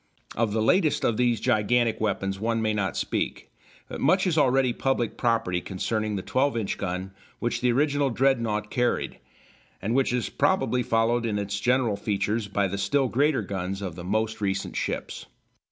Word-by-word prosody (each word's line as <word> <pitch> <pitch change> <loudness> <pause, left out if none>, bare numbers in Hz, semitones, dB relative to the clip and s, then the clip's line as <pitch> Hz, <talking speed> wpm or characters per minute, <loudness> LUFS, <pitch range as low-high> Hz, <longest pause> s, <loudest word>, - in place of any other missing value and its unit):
Of 115 -2 +1
the 110 +1 0
latest 160 - +2
of 115 - +1
these 120 -3 +2
gigantic 110 +1 +1
weapons 95 -2 -1
one 115 +2 0
may 110 -1 0
not 100 -2 -1
speak, - - -2 0.4
but - - -7
much 185 +7 +3
is 180 -4 +1
already 135 -4 +3
public 125 -4 -1
property 115 -7 0
concerning 110 +3 -2
the 95 - -3
12 135 -1 +1
inch 110 -4 -2
gun 95 +1 -3 0.3
which 120 - -2
the 125 -1 +3
original 145 +2 +2
Dreadnought 115 -5 +1
carried, 125 -1 0 0.6
and 110 +4 -2
which 135 0 +2
is 125 -1 0
probably 190 -9 +1
followed 115 +1 +1
in 105 -2 -1
its 100 0 -2
general 120 -3 +1
features 105 +1 -1
by 100 0 0
the 100 +1 -4
still 130 +7 +1
greater 140 -1 +2
guns 95 0 -4
of 95 -4 -4
the 85 - -8
most 110 +3 -1
recent 95 -1 -2
ships. - - -4
115 Hz, 175 wpm, -26 LUFS, 100-125 Hz, 0.6 s, much